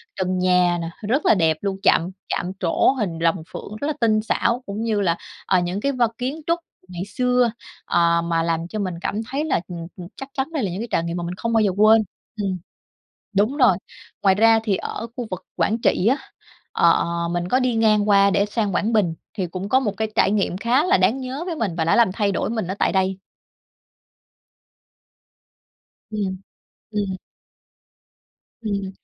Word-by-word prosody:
trần 185 Hz, 0 st, -1 dB
nhà 180 Hz, -1 st, +3 dB
nè, 165 Hz, -, -4 dB, 0.2 s
rất 265 Hz, +7 st, +1 dB
là -, -, +6 dB
đẹp 160 Hz, -5 st, +2 dB
luôn, 195 Hz, -1 st, -2 dB
chạm 170 Hz, -, +4 dB, 0.2 s
chạm 180 Hz, -, -2 dB
trổ 175 Hz, +5 st, +3 dB
hình 205 Hz, -11 st, -3 dB
rồng 165 Hz, 0 st, +1 dB
phượng, 210 Hz, -, -7 dB
rất 285 Hz, -, -1 dB
là 305 Hz, -, 0 dB
tinh 215 Hz, -2 st, +3 dB
xảo. 235 Hz, +3 st, 0 dB
Cũng 205 Hz, +2 st, -5 dB
như 220 Hz, -3 st, 0 dB
là, 170 Hz, -3 st, +1 dB, 0.3 s
ờ, 185 Hz, -, +3 dB
những 175 Hz, +2 st, -2 dB
cái 280 Hz, -, +1 dB
vân 245 Hz, -4 st, +2 dB
kiến 270 Hz, +6 st, -3 dB
trúc 335 Hz, +1 st, +2 dB, 0.3 s
ngày 180 Hz, 0 st, -5 dB
xưa, 250 Hz, +2 st, +1 dB, 0.3 s
ờ, 170 Hz, -1 st, +3 dB
mà 165 Hz, -1 st, 0 dB
làm 165 Hz, 0 st, -1 dB
cho 215 Hz, +4 st, -5 dB
mình 185 Hz, -3 st, -2 dB
cảm 210 Hz, -, -2 dB
thấy 290 Hz, +3 st, -1 dB
là, 315 Hz, -, +1 dB
ừm, 170 Hz, -2 st, -6 dB
ừm, 175 Hz, -2 st, -8 dB
chắc 270 Hz, -, -8 dB
chắn 265 Hz, -1 st, -1 dB
đây 295 Hz, -6 st, -1 dB
là 190 Hz, -, -1 dB
những 190 Hz, +5 st, -4 dB
cái 235 Hz, -, -4 dB
trải 165 Hz, -, +1 dB
nghiệm 170 Hz, +1 st, -3 dB
mà 175 Hz, -, -3 dB
mình 175 Hz, +1 st, -4 dB
không 230 Hz, +4 st, -2 dB
bao 225 Hz, -, +4 dB
giờ 205 Hz, -3 st, +2 dB
quên. 220 Hz, +1 st, +6 dB, 0.4 s
Ừm. 190 Hz, -2 st, -1 dB, 0.8 s
Đúng 215 Hz, +8 st, +2 dB
rồi. 245 Hz, -, +5 dB, 0.5 s
Ngoài 195 Hz, -2 st, +5 dB
ra 225 Hz, +2 st, +5 dB
thì 205 Hz, -4 st, +1 dB
ở 230 Hz, -, -5 dB
khu 245 Hz, -, -4 dB
vực 185 Hz, 0 st, -6 dB
Quảng 200 Hz, +7 st, +1 dB
Trị 185 Hz, -, +2 dB
á, 260 Hz, +4 st, +4 dB, 0.6 s
ờ, 170 Hz, 0 st, +4 dB, 0.2 s
mình 175 Hz, 0 st, -2 dB
có 255 Hz, +7 st, +2 dB
đi 255 Hz, -2 st, +1 dB
ngang 215 Hz, -2 st, +3 dB
qua 200 Hz, -1 st, +5 dB
để 200 Hz, +1 st, +2 dB
sang 210 Hz, -2 st, -1 dB
Quảng 220 Hz, +5 st, +1 dB
Bình, 195 Hz, -7 st, +2 dB, 0.2 s
thì 190 Hz, -4 st, -2 dB
cũng 185 Hz, +3 st, -5 dB
có 260 Hz, +3 st, +4 dB
một 210 Hz, -6 st, -2 dB
cái 220 Hz, +1 st, -1 dB
trải -, -, +3 dB
nghiệm 200 Hz, -3 st, 0 dB
khá 240 Hz, +8 st, +2 dB
là 375 Hz, +2 st, +4 dB
đáng 265 Hz, -, +2 dB
nhớ 260 Hz, +4 st, -5 dB
với 340 Hz, -3 st, -3 dB
mình 205 Hz, -, -1 dB
và 165 Hz, -, +1 dB
đã 165 Hz, -, +3 dB
làm 230 Hz, -6 st, +4 dB
thay 200 Hz, 0 st, 0 dB
đổi -, -, -1 dB
mình 220 Hz, -6 st, -2 dB
ở 190 Hz, -, -3 dB
tại -, -, +2 dB
đây. 190 Hz, 0 st, +1 dB, 2.9 s
Ừm. 200 Hz, -3 st, -2 dB, 0.5 s
Ừm. 200 Hz, -3 st, -1 dB, 1.5 s
Ừm. 200 Hz, -3 st, -2 dB
200 Hz, 205 wpm, -22 LUFS, 180-230 Hz, 2.9 s, là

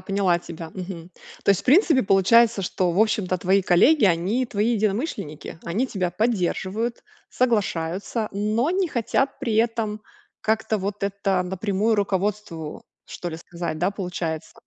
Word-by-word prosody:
поняла 190 Hz, -2 st, +1 dB
тебя. 165 Hz, -1 st, -8 dB
Мгм. 180 Hz, -2 st, -7 dB, 0.3 s
То -, -, +4 dB
есть 195 Hz, -, +3 dB
в -, -, -18 dB
принципе 300 Hz, -1 st, +5 dB
получается, 200 Hz, +3 st, +4 dB
что 180 Hz, 0 st, 0 dB
в 170 Hz, -, -1 dB
общем-то 210 Hz, -4 st, +1 dB
твои 190 Hz, +3 st, +2 dB
коллеги 220 Hz, -, +5 dB
они 190 Hz, +9 st, +1 dB
твои 220 Hz, 0 st, 0 dB
единомышленники, 210 Hz, -, -2 dB
они 210 Hz, +10 st, 0 dB
тебя 185 Hz, -6 st, -2 dB
поддерживают, 220 Hz, +2 st, -1 dB, 0.3 s
соглашаются, 210 Hz, -2 st, -1 dB
но 215 Hz, +8 st, 0 dB
не 370 Hz, 0 st, +1 dB
хотят 270 Hz, +2 st, 0 dB
при 240 Hz, -6 st, -2 dB
этом 225 Hz, -2 st, 0 dB, 0.4 s
как-то 220 Hz, 0 st, 0 dB
вот 200 Hz, +1 st, -4 dB
это 195 Hz, -2 st, 0 dB
напрямую 195 Hz, +4 st, 0 dB
руководству 195 Hz, -5 st, -2 dB, 0.3 s
что 175 Hz, -, -5 dB
ли 160 Hz, -, -6 dB
сказать. 170 Hz, -2 st, -5 dB
Да, 180 Hz, +4 st, +1 dB
получается. 180 Hz, -5 st, -4 dB
200 Hz, 145 wpm, -24 LUFS, 180-225 Hz, 0.4 s, принципе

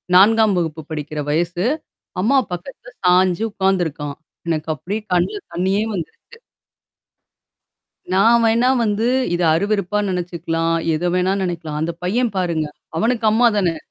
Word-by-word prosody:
4 215 Hz, +1 st, +5 dB
வகுப்பு 160 Hz, -2 st, -2 dB
படிக்கிற 150 Hz, -1 st, -5 dB
வயசு. 175 Hz, +3 st, 0 dB, 0.6 s
அம்மா 270 Hz, +7 st, +3 dB
பக்கத்தல 245 Hz, +7 st, -8 dB
சாஞ்சு 180 Hz, +2 st, +3 dB
உக்காந்துருக்கான். 170 Hz, -8 st, -1 dB, 0.3 s
எனக்கு 160 Hz, -1 st, -2 dB
அப்டியே 200 Hz, +9 st, -4 dB
கண்ல 295 Hz, -, +1 dB
தண்ணீயே 190 Hz, +4 st, +1 dB
வந்துருச்சு. 200 Hz, -, -8 dB, 1.8 s
நான் 230 Hz, +5 st, +5 dB
வேணா 235 Hz, +3 st, +3 dB
வந்து, 220 Hz, +2 st, 0 dB, 0.3 s
இத 175 Hz, -, -2 dB
அருவருப்பா 200 Hz, +2 st, 0 dB
நெனச்சுக்கலாம். 165 Hz, -2 st, -1 dB, 0.2 s
எத 175 Hz, +3 st, -1 dB
வேணா 185 Hz, +1 st, +2 dB
நெனைக்கலாம். 160 Hz, -4 st, -4 dB
அந்த 165 Hz, -, -1 dB
பையன் 230 Hz, +5 st, 0 dB
பாருங்க 165 Hz, -4 st, 0 dB, 0.3 s
அவனுக்கு 230 Hz, 0 st, +1 dB
அம்மா 240 Hz, +2 st, +4 dB
தானே! 175 Hz, -5 st, +1 dB
180 Hz, 120 wpm, -20 LUFS, 165-215 Hz, 1.8 s, 4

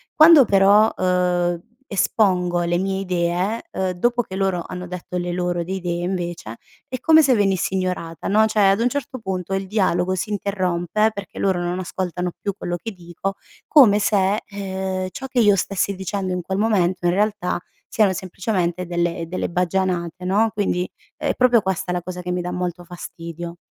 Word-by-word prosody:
Quando 310 Hz, -3 st, +8 dB
però, 200 Hz, +2 st, +5 dB
uhm, 180 Hz, -1 st, +1 dB, 0.3 s
espongo 180 Hz, -4 st, +1 dB
le 170 Hz, 0 st, +1 dB
mie 190 Hz, 0 st, -1 dB
idee, 180 Hz, +3 st, -1 dB
uhm, 190 Hz, -1 st, -1 dB
dopo 240 Hz, +7 st, +1 dB
che 190 Hz, -, -8 dB
loro 190 Hz, -3 st, 0 dB
hanno 180 Hz, 0 st, -6 dB
detto 180 Hz, 0 st, -7 dB
le 175 Hz, 0 st, -2 dB
loro 175 Hz, -1 st, -1 dB
di 185 Hz, +3 st, -4 dB
idee 175 Hz, -2 st, -3 dB
invece, 175 Hz, -, -4 dB, 0.3 s
è 255 Hz, -, -4 dB
come 315 Hz, +4 st, +6 dB
se 265 Hz, -2 st, +4 dB
venisse 195 Hz, -3 st, +1 dB
ignorata 180 Hz, -3 st, -3 dB
no, 215 Hz, +2 st, +4 dB
cioè 215 Hz, -, -1 dB
ad 195 Hz, +3 st, +2 dB
un 245 Hz, -, +3 dB
certo 280 Hz, -1 st, -4 dB
punto 190 Hz, -3 st, -4 dB
il 195 Hz, 0 st, -2 dB
dialogo 185 Hz, -3 st, +1 dB
si 190 Hz, +3 st, -3 dB
interrompe, 195 Hz, +1 st, 0 dB
perché 200 Hz, -3 st, -8 dB
loro 190 Hz, -2 st, +1 dB
non 175 Hz, +1 st, -2 dB
ascoltano 180 Hz, -1 st, -3 dB
più 200 Hz, -, -2 dB
quello 175 Hz, -, -3 dB
che 225 Hz, +6 st, -6 dB
dico, 180 Hz, +1 st, -5 dB, 0.3 s
come 230 Hz, -9 st, +6 dB
se, 205 Hz, 0 st, +2 dB
ehm, 190 Hz, -2 st, -4 dB
ciò 265 Hz, -, -6 dB
che 255 Hz, -1 st, 0 dB
io 210 Hz, -3 st, +5 dB
stessi 195 Hz, +1 st, -1 dB
dicendo 190 Hz, 0 st, -3 dB
in 180 Hz, -, -2 dB
quel 190 Hz, +2 st, -3 dB
momento, 190 Hz, -5 st, +1 dB
in 175 Hz, -, +3 dB
realtà, 205 Hz, -2 st, 0 dB, 0.3 s
siano 210 Hz, -3 st, +3 dB
semplicemente 185 Hz, -1 st, -2 dB
delle 170 Hz, -1 st, -2 dB
delle 185 Hz, -, -2 dB
baggianate 180 Hz, 0 st, -1 dB
no, 210 Hz, +4 st, +2 dB
quindi 190 Hz, -4 st, -1 dB, 0.3 s
è -, -, -1 dB
proprio 245 Hz, -2 st, +4 dB
questa 185 Hz, -2 st, -2 dB
la 180 Hz, -, -1 dB
cosa 180 Hz, +1 st, -6 dB
che 180 Hz, 0 st, -4 dB
mi 180 Hz, -, -1 dB
dà 180 Hz, 0 st, -4 dB
molto 180 Hz, -1 st, -3 dB
fastidio. 170 Hz, -1 st, -8 dB
185 Hz, 180 wpm, -22 LUFS, 175-200 Hz, 0.3 s, Quando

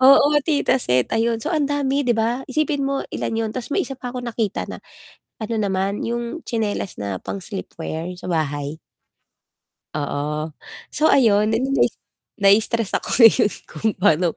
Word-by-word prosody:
Oo, 275 Hz, +2 st, +7 dB, 0.2 s
tita 290 Hz, -4 st, +2 dB
set. 125 Hz, -, +1 dB
Ayun, 225 Hz, 0 st, 0 dB
so -, -, -3 dB
ang 310 Hz, -4 st, +1 dB
dami 285 Hz, 0 st, 0 dB
'di 245 Hz, -, +3 dB
ba? 235 Hz, +4 st, 0 dB
Isipin 290 Hz, 0 st, 0 dB
mo 275 Hz, 0 st, 0 dB
ilan -, -, -3 dB
yun, 225 Hz, 0 st, -1 dB
tapos 250 Hz, +5 st, -5 dB
may 390 Hz, -, +2 dB
isa 270 Hz, -7 st, -4 dB
pa 245 Hz, -2 st, -6 dB
ako 250 Hz, -, -4 dB
nakita 230 Hz, -4 st, -2 dB
na, -, -, -6 dB, 0.6 s
ano 225 Hz, +1 st, -3 dB
naman 195 Hz, 0 st, -1 dB
yung 235 Hz, +7 st, -3 dB
tsinelas 215 Hz, -4 st, -3 dB
na 100 Hz, -2 st, -4 dB
pang -, -, -5 dB
sleep 195 Hz, +1 st, -6 dB
wear, 165 Hz, +1 st, -4 dB
yung 180 Hz, -, -8 dB
sa -, -, -10 dB
bahay. 150 Hz, -2 st, -2 dB, 1.1 s
Oo. 150 Hz, +1 st, -2 dB, 0.4 s
So 305 Hz, +1 st, +1 dB
ayun 215 Hz, -4 st, +4 dB
eh 225 Hz, -, +1 dB
'di 270 Hz, -, -1 dB
nais 275 Hz, -, +2 dB, 0.4 s
naistress 210 Hz, +2 st, +3 dB
ako -, -, -1 dB
ngayon 225 Hz, -3 st, +7 dB, 0.2 s
kung 170 Hz, +8 st, -2 dB
pano, 180 Hz, -3 st, +2 dB
225 Hz, 175 wpm, -22 LUFS, 180-260 Hz, 1.1 s, Oo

